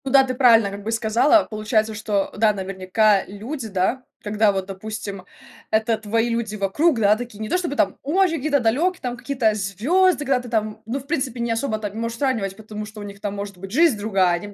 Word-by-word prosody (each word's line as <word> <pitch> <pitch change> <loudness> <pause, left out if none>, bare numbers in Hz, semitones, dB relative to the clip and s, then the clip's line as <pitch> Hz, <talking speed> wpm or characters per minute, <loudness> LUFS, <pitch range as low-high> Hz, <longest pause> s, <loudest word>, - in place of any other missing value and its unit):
Ну 265 - -2
да, 270 0 +7
ты 255 -1 -2
правильно 230 -5 +5
как 200 0 -8
бы 220 - -3
сказала. 230 +8 +3
Получается, 215 0 -1
что, 210 -2 -1
да, 215 0 +3
наверняка 195 +2 +1
люди, 225 +6 -6
да, 200 +6 -1 0.2
когда 210 0 +2
вот, 190 -1 -2
допустим, 200 -1 -6 0.4
это 220 +1 +1
твои 225 +2 0
люди 230 -2 -2
вокруг, 230 - +1
да, 210 -1 +5
такие 235 -2 -8
не 215 0 -4
то - - +2
чтобы 340 -5 -3
там 195 -7 +1
очень 345 +4 +2
какие-то 290 0 +1
далекие, 255 +2 0
какие-то 245 -3 0
звезды, 285 - +1
когда 265 -1 +2
ты 245 -1 -9
там, 215 -1 -2
ну, 240 +5 -3
в 270 - -13
принципе, 265 -6 -2
не 235 0 -1
особо 225 0 -1
там 210 -2 -5
и - - -14
можешь 230 +1 -3
сравнивать, 230 -8 -1
потому 215 0 -7
что 215 0 -11
у - - -6
них 200 -1 -9
там 205 -1 -3
может 200 -1 -6
быть 190 +1 -9
жизнь 305 -1 +4
другая, 195 -3 +2
они 175 +4 -2
в 205 - -11
220 Hz, 225 wpm, -22 LUFS, 205-255 Hz, 0.4 s, да